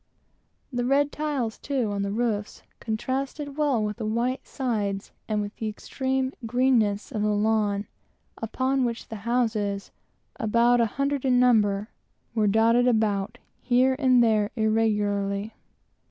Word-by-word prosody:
The 245 0 0
red 280 +3 +2
tiles, 280 -7 -2
too, 260 -7 -1
on 200 -1 -2
the 200 - -1
roofs, 215 -2 -2 0.2
contrasted 270 +5 -3
well 285 -7 +1
with 210 +1 -3
the 225 - -4
white 240 +4 0
plastered - - -30
sides 210 -6 -2 0.2
and 215 -1 0
with 205 +1 -7
the 220 - -3
extreme 260 +4 -2
greenness 230 -3 +1
of 215 - -2
the 210 - +1
lawn 210 -1 +1 0.5
upon 260 +4 -1
which 235 -1 -3
the 220 - -5
houses 215 -5 0 0.5
about 235 +2 +3
an 230 - +3
hundred 275 +3 -1
in 255 -2 +3
number 215 -4 +3 0.4
were 215 -2 +2
dotted 230 +4 +4
about, 215 -4 +1 0.2
here 255 +1 +3
and 255 -3 +5
there, 215 -2 +2
irregularly. 210 -2 0
225 Hz, 140 wpm, -26 LUFS, 210-255 Hz, 0.5 s, and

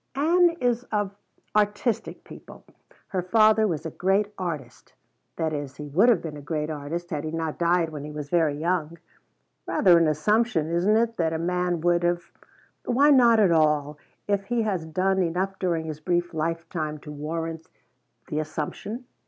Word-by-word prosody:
"Ann 335 +4 +3
is 245 -1 +1
of 205 -2 -2 0.4
artistic 210 +2 0
people. - - -13 0.4
Her 185 - -1
father 215 +3 +4
was 165 -4 -3
a 160 - -4
great 200 +5 0
artist. 155 -9 -6 0.4
That 160 -1 -1
is, 145 -2 -5
he 150 +1 -8
would 195 - +4
have 220 -8 +3
been 155 -3 -6
a - - -9
great 150 +1 -3
artist 155 +4 -5
had 150 -2 -2
he 155 - -3
not 160 -1 -3
died 170 -1 +2
when 150 -2 -7
he 150 - -7
was 150 -1 -6
very 160 -2 +2
young." 170 0 -1 0.7
"Rather 175 -3 +5
an 165 - +3
assumption, 165 +1 +1
isn't 185 +6 +3
it, 230 0 0
that 165 -2 0
a - - -1
man 180 0 -1
would 175 0 +2
have 175 0 -1 0.3
" - - -34
"Why 280 +5 +4
not 240 -4 +6
at 195 -5 +4
all, 150 -2 +2 0.3
if 200 -1 0
he 235 +1 0
has 185 -7 -2
done 190 +4 +1
enough 185 +3 -1
during 170 -3 -1
his 155 -1 -6
brief 175 +1 -1
lifetime 160 -1 -3
to 150 - -9
warrant 160 +2 -5 0.6
the 150 - -2
assumption." 160 - -5
170 Hz, 175 wpm, -25 LUFS, 155-205 Hz, 0.7 s, not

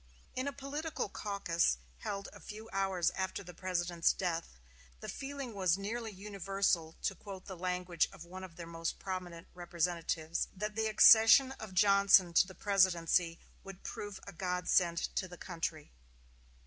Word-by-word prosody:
In 255 +2 -2
a - - -1
political 285 0 -4
caucus, 175 - 0 0.2
held 200 - -4
a - - -12
few 215 +1 -9
hours 190 -3 +1
after 190 +1 -3
the 180 -1 -10
President's 175 -1 0
death, 170 - -3 0.4
"the - - -8
feeling 275 -3 -6
was 185 -3 +2
nearly 225 +3 -4
universal," 195 -4 -1
to - - +1
quote 190 0 -10
the 190 - -7
language 180 -1 -1
of 190 -4 -11
one 185 +2 -9
of 180 -3 -10
their 170 - -8
most 165 0 -4
prominent 180 -3 -6
representatives, 170 -2 -2
"that 210 +3 -3
the 220 +1 0
accession 225 +4 +8
of 205 -4 -8
Johnson 200 -2 +5
to 180 - +5
the 190 - -11
presidency 180 -4 +2 0.3
would 195 -1 -11
prove 205 -2 -6
a - - -9
godsend 180 -1 +1 0.2
to 185 - -1
the 180 0 -11
country." 165 -4 -5
185 Hz, 155 wpm, -33 LUFS, 170-200 Hz, 0.4 s, accession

